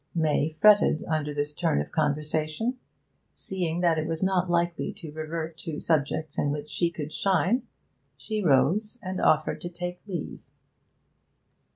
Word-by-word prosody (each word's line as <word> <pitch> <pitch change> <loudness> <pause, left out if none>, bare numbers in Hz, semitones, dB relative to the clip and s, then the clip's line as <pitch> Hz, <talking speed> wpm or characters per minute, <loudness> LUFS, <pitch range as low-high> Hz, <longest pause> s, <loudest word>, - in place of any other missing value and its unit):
May 155 -1 +1
fretted 205 -6 +6
under 155 -2 -1
this 145 0 -2
turn 70 - +1
of 75 - -1
the - - -26
conversation. 155 - 0 0.6
Seeing 175 -3 -3
that 170 -3 +3
it 155 - -2
was 165 +2 -1
not 185 -1 +1
likely 170 0 0
to 160 -3 -9
revert 160 +1 -5
to 160 -4 -5
subjects 155 -1 0
in 145 - +1
which 145 +1 -4
she 170 - +1
could 155 -2 -6
shine, 195 +5 +1 0.5
she 215 -1 -3
rose 185 - +3
and 185 0 -3
offered 155 0 +2
to 175 - -4
take 180 +1 -5
leave. 175 -6 -5
160 Hz, 155 wpm, -27 LUFS, 155-180 Hz, 0.6 s, fretted